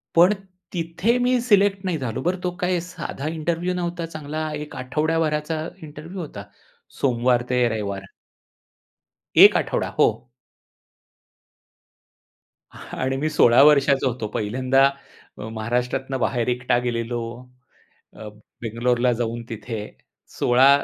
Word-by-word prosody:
पण 180 +5 +6 0.4
तिथे 175 +8 0
मी 250 0 +2
सिलेक्ट 200 -4 +3
नाही 180 -3 0
झालो. 130 -4 -4
बरं, 180 +3 -1
तो 180 - 0
काय 180 -1 +1
साधा 165 -4 -6
इंटरव्ह्यू 170 +3 -1
नव्हता, 175 -1 -3
चांगला 155 -1 -5
एक 150 0 -6
आठवडाभराचा 155 +3 -1 0.2
इंटरव्ह्यू 160 +6 -9
होता. 105 -10 -7 0.6
सोमवार 125 -1 +2
ते 125 -1 +3
रविवार. 100 -3 -4 1.3
1 - - +9
आठवडा - - -1
हो. - - +6 2.6
आणि 130 +1 -4
मी 155 +3 -1
16 125 -4 +5
वर्षाचा 140 -2 +4
होतो 115 -3 -3
पहिल्यांदा, 130 +5 +2 0.5
महाराष्ट्रातून 120 +4 -2
बाहेर 120 -1 0
एकटा 125 0 +1
गेलेलो. 120 -1 -2 0.9
अ, 110 - -9 0.3
बेंगलोरला 120 +2 +1
जाऊन 115 0 -3
तिथे 110 0 -5 0.6
16 130 +3 +5
135 Hz, 110 wpm, -23 LUFS, 120-165 Hz, 2.6 s, 1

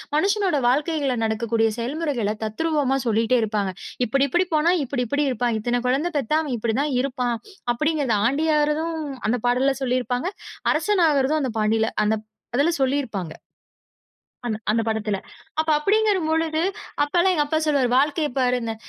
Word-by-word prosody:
மனுஷனோட 390 -2 +2
வாழ்க்கைகள்ல 285 -2 0
நடக்கக்கூடிய 225 0 +1
செயல்முறைகளத் 240 -5 -2
தத்ரூவமா 280 +3 0
சொல்லிட்டே 230 +3 +2
இருப்பாங்க. 205 -3 -1 0.3
"இப்படி 275 +4 +2
இப்படி 350 +6 +2
போனா, 310 +3 +3
இப்படி 255 -1 -2
இப்படி 285 +4 0
இருப்பான். 240 -1 0
இத்தன 240 +2 0
கொழந்த 275 +7 +1
பெத்தா 285 +3 +1
அவன் 285 -5 -3
இப்படி 225 0 -1
தான் 295 -1 -1
இருப்பான்." 250 -3 -1 0.4
அப்படீங்கறது. 290 -3 0
ஆண்டி 295 +6 0
ஆறதும் 310 +3 0 0.3
அந்தப் 245 +1 -1
பாடல்ல 265 +3 +2
சொல்லி 255 0 +1
இருப்பாங்க. 245 +5 -2 0.5
அரசன் 355 +4 +2
ஆகுறதும் 285 +2 +2
அந்தப் 235 -5 -3
பாண்டில 220 +1 +2
அந்தப் 215 0 0 0.3
அதுல 290 +6 +3
சொல்லியிருப்பாங்க. 245 - -1 1.1
அந்த 215 -3 -1
அந்தப் 225 +1 0
படத்துல. 215 -2 -1 0.4
அப்ப 315 0 0
அப்படீங்கிற 420 +4 +2
பொழுது 320 0 +1 0.4
அப்பல்லாம் 350 +5 +2
எங்க 295 - +3
அப்பா 315 +2 0
சொல்லுவாரு, 280 -5 +2
'வாழ்க்கையப் 295 0 +1
பாரு 250 -1 +2
இந்த' 225 -1 -3
265 Hz, 150 wpm, -23 LUFS, 230-305 Hz, 1.1 s, போனா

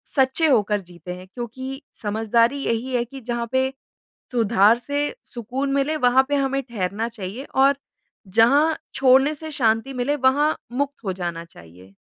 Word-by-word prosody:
सच्चे 265 +4 +3
होकर 210 -5 +2
जीते 175 -1 -9
हैं 185 +1 -12
क्योंकि 260 +3 -6 0.2
समझदारी 225 +4 +1
यही 235 +3 -2
है 240 - +2
कि 270 +3 -11
जहाँ 235 0 -3
पे 260 0 +1 0.6
सुधार 225 -1 +4
से 285 +3 -2 0.2
सुकून 255 +4 -3
मिले 280 +3 +1
वहाँ 260 -1 +4
पे 290 - 0
हमें 275 0 0
ठहरना 220 -2 -3
चाहिए 225 +2 -7
और 275 +1 +4 0.6
जहाँ 290 +8 +5 0.2
छोड़ने 270 +3 +4
से 315 +1 -8
शांति 230 -2 +1
मिले 255 +4 0
वहाँ 285 +3 +2 0.2
मुक्त 280 0 -3
हो 190 - -1
जाना 170 -2 -4
चाहिए। 90 - -16
245 Hz, 155 wpm, -23 LUFS, 215-275 Hz, 0.6 s, जहाँ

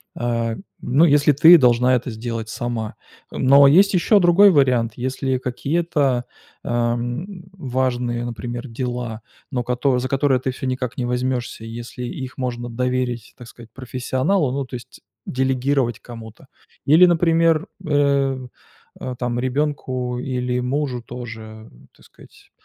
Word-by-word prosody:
А, 115 -1 -1 0.3
ну, 140 +7 +3
если 145 -1 +4
ты 165 +5 +8
должна 125 -1 +4
это 125 0 -3
сделать 115 0 -5
сама. 115 -2 -4 0.4
Э, - - -7
но 140 +2 +6
есть 195 +8 +5
ещё 200 +4 +4
другой 180 +3 +6
вариант. 125 -7 +2
Если 130 +1 -2
какие-то, 135 0 -1 0.4
эм, 120 - -2
важные, 125 -6 -2
например, 120 +1 -6
дела, 120 -2 -4 0.3
но 125 -3 -1
кото 125 +1 0
за 130 - -3
которые 135 -2 +1
ты 130 - -1
всё 130 - -7
никак 130 -1 -3
не 125 - -2
возьмешься, 125 -1 -2
и 115 - -8
если 120 +2 -7
их 130 0 -6
можно 120 -2 -4
доверить, 125 -1 -2
так 120 - -12
сказать, 115 0 -14
профессионалу, 130 +5 -1
ну, 140 +1 -2
то 130 - -8
есть 120 - -11 0.3
делегировать 130 -2 0
кому-то. 115 +1 -12 0.4
Или, 160 +6 +7
например, 165 0 +2 0.2
э, 140 -2 +2 0.6
э, 125 - -5
там, 120 -1 -2
ребенку 130 -2 -2
или 125 -1 -2
мужу 130 0 -2
тоже, 115 -2 -9 0.3
так - - -21
сказать, - - -20
125 Hz, 140 wpm, -21 LUFS, 120-140 Hz, 0.6 s, ты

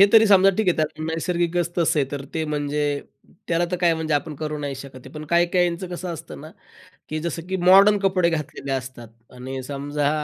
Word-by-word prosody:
हे 200 - +9
तरी 225 -1 +7
समजा 195 -1 +6
ठीक 220 -3 0
आहे, 175 - +2
त्याला 155 0 -2
नैसर्गिकच 170 0 -1
तसं 165 -1 +2
आहे. 140 - +2
तर 140 -1 -4
ते 160 -1 -1
म्हणजे 150 -1 -2 0.7
त्याला 170 0 +2
तर 180 - 0
काय 170 -2 +4
म्हणजे 160 -1 -1
आपण 150 +2 -2
करू 150 -1 -3
नाही 140 -2 -4
शकत 135 0 -10
आहे. - - -10
पण 155 0 -6
काही-काहीचं 175 +1 +2
कसं 175 0 -5
असतं 160 - -10
ना, - - -10 0.6
की 155 - -3
जसं 165 +1 -4
की 190 - -1
मॉडर्न 200 +2 +7
कपडे 185 -3 +2
घातलेले 150 -3 -4
असतात 130 -3 -5 0.3
आणि 130 +1 -5
समजा, 145 +2 -2
160 Hz, 205 wpm, -23 LUFS, 145-175 Hz, 0.7 s, हे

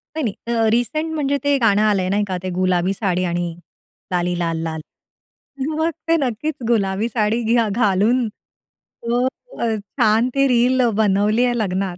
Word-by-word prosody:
नाही 315 - -2 0.2
नाही, 230 -2 +2
रिसेंट 305 +8 0
म्हणजे 285 -2 0
ते 285 0 +3
गाणं 210 -5 +3
आलंय 200 -4 +2
नाही 205 +2 +1
का, 185 -2 -2
ते 185 - -3
गुलाबी 185 0 +1
साडी 185 -3 -1
आणि 175 -1 -2 0.6
लाली 180 -1 0
लाल 165 -1 -1
लाल. 160 -1 -4 1.0
मग 320 +1 +1 0.2
ते 330 - +4
नक्कीच 275 +2 -2
गुलाबी 205 -2 +1
साडी 225 0 0
घ्या 230 0 +2
घालून, 225 +3 +2
तो 235 +3 -6 0.3
अ, - - 0
छान 215 +3 +1
ते 275 0 +3
रील 250 +1 +3 0.2
बनवली 210 +3 +2
आहे 240 -1 0
लग्नात. 190 -3 -2
215 Hz, 155 wpm, -20 LUFS, 190-245 Hz, 1.0 s, ते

